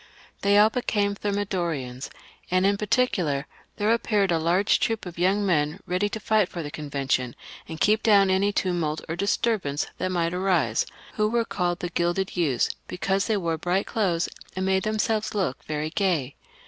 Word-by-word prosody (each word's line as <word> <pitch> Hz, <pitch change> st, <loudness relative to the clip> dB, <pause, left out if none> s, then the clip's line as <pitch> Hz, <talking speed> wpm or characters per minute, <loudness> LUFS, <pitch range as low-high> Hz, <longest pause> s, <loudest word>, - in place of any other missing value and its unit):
They 200 Hz, +1 st, +4 dB
all 215 Hz, +1 st, +6 dB
became 205 Hz, -5 st, 0 dB
Thermidorians, 175 Hz, -11 st, -3 dB, 0.4 s
and 185 Hz, +1 st, +2 dB
in 200 Hz, +1 st, +4 dB
par 210 Hz, +1 st, -4 dB
ticular, 175 Hz, -, +1 dB, 0.3 s
there 210 Hz, +1 st, +1 dB
appeared 210 Hz, -4 st, +1 dB
a 165 Hz, -, +2 dB
large 175 Hz, +6 st, +2 dB
troop 225 Hz, -2 st, -1 dB
of 175 Hz, -1 st, -8 dB
young 195 Hz, +3 st, +2 dB
men, 155 Hz, -1 st, +1 dB
ready 185 Hz, +3 st, 0 dB
to 220 Hz, -, -5 dB
fight 215 Hz, -3 st, +2 dB
for 170 Hz, -, -5 dB
the 145 Hz, -, -6 dB
Convention, 135 Hz, -5 st, -2 dB, 0.3 s
and 160 Hz, -1 st, -6 dB
keep 215 Hz, +4 st, +3 dB
down 200 Hz, -4 st, +5 dB
any 195 Hz, +2 st, +2 dB
tumult 170 Hz, -6 st, -1 dB
or 165 Hz, -, -3 dB
disturbance 200 Hz, -6 st, 0 dB
that 185 Hz, -, -1 dB
might 170 Hz, -1 st, 0 dB
arise, 180 Hz, -, +1 dB, 0.3 s
who 210 Hz, 0 st, +2 dB
were 230 Hz, 0 st, +1 dB
called 175 Hz, -4 st, -1 dB
the 175 Hz, -, -2 dB
Gilded 175 Hz, +3 st, -1 dB
Youths, 150 Hz, -9 st, +1 dB, 0.2 s
because 195 Hz, +2 st, -1 dB
they 220 Hz, -, +1 dB
wore 165 Hz, -4 st, -1 dB
bright 180 Hz, +4 st, 0 dB
clothes, 180 Hz, -6 st, 0 dB, 0.3 s
and 185 Hz, 0 st, -1 dB
made 190 Hz, 0 st, +2 dB
them 215 Hz, +1 st, -1 dB
selves 215 Hz, 0 st, 0 dB
look 185 Hz, -10 st, -1 dB
very 155 Hz, 0 st, -3 dB
gay. 165 Hz, -10 st, 0 dB
185 Hz, 180 wpm, -25 LUFS, 165-205 Hz, 0.4 s, all